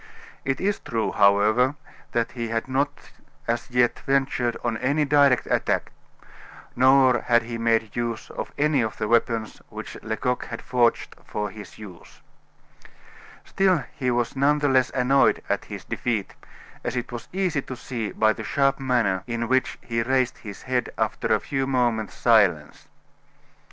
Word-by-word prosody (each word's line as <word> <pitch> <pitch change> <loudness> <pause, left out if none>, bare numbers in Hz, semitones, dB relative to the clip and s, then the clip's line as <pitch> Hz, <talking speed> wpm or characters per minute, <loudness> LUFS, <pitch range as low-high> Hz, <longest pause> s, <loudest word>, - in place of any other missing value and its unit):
It 135 0 -1
is 200 +2 0
true, 115 -1 -2
however, 105 +6 +3 0.4
that 115 -1 0
he 120 -2 -4
had 115 +1 -2
not 135 +2 -2 0.4
as 120 +2 -2
yet 125 -1 +2
ventured 135 -3 0
on - - 0
any 140 +5 +1
direct 140 -3 +4
attack, - - 0 0.8
nor 130 -1 +5
had 120 -1 +3
he 115 0 -6
made 115 -2 +1
use 120 -2 -3
of - - -6
any 150 -2 +2
of 110 -2 -3
the 105 - -2
weapons 115 -1 0
which - - -8
Lecoq 125 +3 -2
had 115 - -6
forged 120 -2 +1
for 105 -1 -4
his 105 -2 -11
use. 100 -5 -13 1.2
Still 185 -6 +2
he 130 -2 -1
was 120 +1 0
none 140 +2 +3
the 145 -1 +1
less 130 -1 +3
annoyed 135 +2 +2
at - - -1
his - - -8
defeat, 110 -5 -2 0.5
as 120 - -3
it 125 0 -3
was 120 -1 -7
easy 185 -6 0
to 130 - -7
see 120 -4 -5
by 110 0 +2
the - - -7
sharp 135 0 +1
manner 120 -8 +1
in 115 -1 -2
which 130 +1 +1
he 115 -1 -1
raised 130 +1 0
his 100 -3 -9
head 125 -2 -1
after - - -1
a - - +4
few 135 -1 -2
moments' 120 -5 0
silence. - - +2
125 Hz, 160 wpm, -24 LUFS, 115-135 Hz, 1.2 s, nor